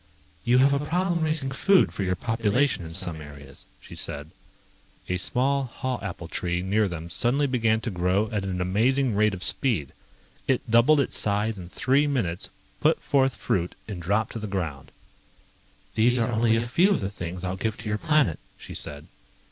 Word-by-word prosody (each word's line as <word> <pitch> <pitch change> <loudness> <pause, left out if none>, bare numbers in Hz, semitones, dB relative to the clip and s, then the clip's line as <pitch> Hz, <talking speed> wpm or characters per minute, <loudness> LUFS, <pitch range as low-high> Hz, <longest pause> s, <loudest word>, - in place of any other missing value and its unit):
"You 120 +4 +4
have 135 +2 +5
a 140 +1 0
problem 175 +2 0
raising 155 -4 0
food 195 +7 +4
for - - -5
your 90 -1 0
population 115 +2 0
in 80 - -7
some 80 -1 -1
areas," 70 -2 -11
she - - -12
said.... 75 +2 -4 0.8
A 90 - 0
small 135 +6 +1
haw 130 0 -4
apple 90 -4 -6
tree 90 +1 -2
near 105 +3 +2
them 85 -2 -6
suddenly 125 +11 +1
began 115 -4 +1
to 115 - -3
grow 90 +4 +1
at 105 -3 -1
an 95 -1 -3
amazing 120 +7 +2
rate 105 -1 +2
of 90 - -6
speed. 95 - +1 0.5
It 130 -2 0
doubled 120 +6 +5
its 135 - -2
size 105 0 0
in 85 -1 -9
three 140 +8 +2
minutes, 100 -12 -1 0.3
put - - +3
forth 135 -2 +2
fruit 90 -1 -1
and 100 -5 -6
dropped 105 +6 0
it - - -11
to 115 - -4
the 110 - -5
ground. 85 -9 -4 1.0
"These 120 +3 +3
are 115 0 +1
only 115 0 +3
a 115 +1 -1
few 175 +11 +3
of 200 - +2
the 100 -1 -3
things 90 -1 -6
I'll 90 0 -2
give 110 +3 -2
to 110 - -8
your 105 0 -1
planet," 150 - +2 0.2
she - - -10
said. 75 0 -5
110 Hz, 190 wpm, -26 LUFS, 90-130 Hz, 1.0 s, have